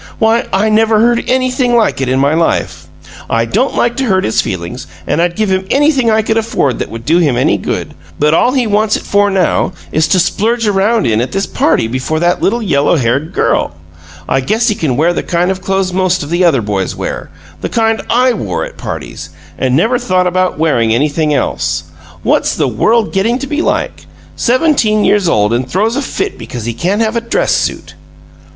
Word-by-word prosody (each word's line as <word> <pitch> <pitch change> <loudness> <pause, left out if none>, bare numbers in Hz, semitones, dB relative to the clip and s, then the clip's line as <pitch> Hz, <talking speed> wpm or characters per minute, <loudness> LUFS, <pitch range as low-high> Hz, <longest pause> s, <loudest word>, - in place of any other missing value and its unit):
Why, 225 +2 +2
I 210 +3 +1
never 220 0 +3
heard 235 +1 +2
anything 255 -1 +1
like 225 -11 +1
it 130 - -1
in 130 +1 +1
my 140 +2 +2
life! 165 +1 -1 0.4
I 115 0 +1
don't 240 - 0
like 240 0 +1
to 270 - 0
hurt 190 -5 +1
his 110 - +1
feelings, 85 -3 -5 0.2
and 165 - 0
I'd 175 0 0
give 215 -2 0
him 190 0 -1
anything 275 -4 +2
I 220 0 +2
could 220 +1 0
afford 215 - 0
that - - -3
would 115 0 -8
do 165 +6 +3
him 145 -8 +1
any 125 - +2
good, - - -4 0.2
but 150 +1 +2
all 245 +9 +3
he 260 -3 +1
wants 210 0 +1
it - - -4
for 205 0 +2
now 185 -1 +1 0.2
is 155 0 +1
to 185 - +2
splurge 230 +6 0
around 205 - +1
in 110 -1 +1
at 125 - -4
this 195 +1 0
party 135 - +1
before 130 +6 -2
that 175 +1 +1
little 235 +4 0
yellow 145 -4 +2
haired 140 +3 0
girl! - - 0 0.5
I 135 - +1
guess 220 - +1
he - - +2
can 155 -11 -2
wear 165 +4 +2
the - - -2
kind 175 +2 0
of 190 -1 -5
clothes 190 -1 -1
most 185 -2 +1
of 145 - -8
the 175 +2 +1
other 135 -9 +2
boys 100 -2 -2
wear - - -5 0.3
the - - -3
kind 225 -1 +1
I 250 +1 +3
wore - - -3
at - - -12
parties - - -7 0.3
and 130 -1 0
never 225 - +2
thought 185 -7 +1
of 185 -1 0
wearing 130 -8 +1
anything 150 +5 +1
else. 140 -3 -1 0.4
What's - - +1
the - - 0
world 225 0 +1
getting 215 +5 +1
to 275 - -5
be 295 +3 -2
like? - - -2 0.3
Seventeen 240 -5 +2
years 200 -4 +2
old 105 -2 +2
and 125 +2 -1
throws 215 - 0
a 280 - -1
fit 390 +7 -4
because 120 -3 -7
he 120 - -2
can't 185 - -1
have 220 +1 -1
a 235 - 0
dress 230 - 0
suit!" - - -2
190 Hz, 210 wpm, -13 LUFS, 150-225 Hz, 0.5 s, never